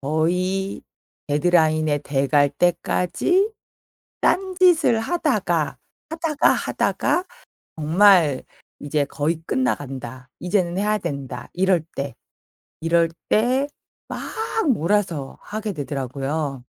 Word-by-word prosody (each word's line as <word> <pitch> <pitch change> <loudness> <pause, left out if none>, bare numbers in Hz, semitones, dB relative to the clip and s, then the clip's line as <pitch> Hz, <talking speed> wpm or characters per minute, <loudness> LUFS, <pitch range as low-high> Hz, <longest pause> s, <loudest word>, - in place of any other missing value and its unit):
거의 180 +6 -1 0.5
데드라인에 155 -1 +2
돼 140 -1 -1
갈 145 +1 +3
때까지 180 - +1 0.7
딴 380 0 +1
짓을 330 -11 +5
하다가, 345 +10 0 0.3
하다가, 320 -2 +2
하다가 360 - 0 0.5
'정말 165 -2 +4 0.4
이제 145 0 0
거의 155 +4 -2
끝나간다. 130 - -3
이제는 180 -1 0
해야 210 +1 +1
된다.' 135 -8 -6
이럴 185 -2 +2
때, 140 -3 -3 0.7
이럴 165 0 +3 0.2
때 255 +6 +2 0.4
막 - - -5 0.5
몰아서 170 - 0
하게 215 -1 -4
되더라고요. 140 -1 -3
170 Hz, 205 characters per minute, -22 LUFS, 145-210 Hz, 0.7 s, 짓을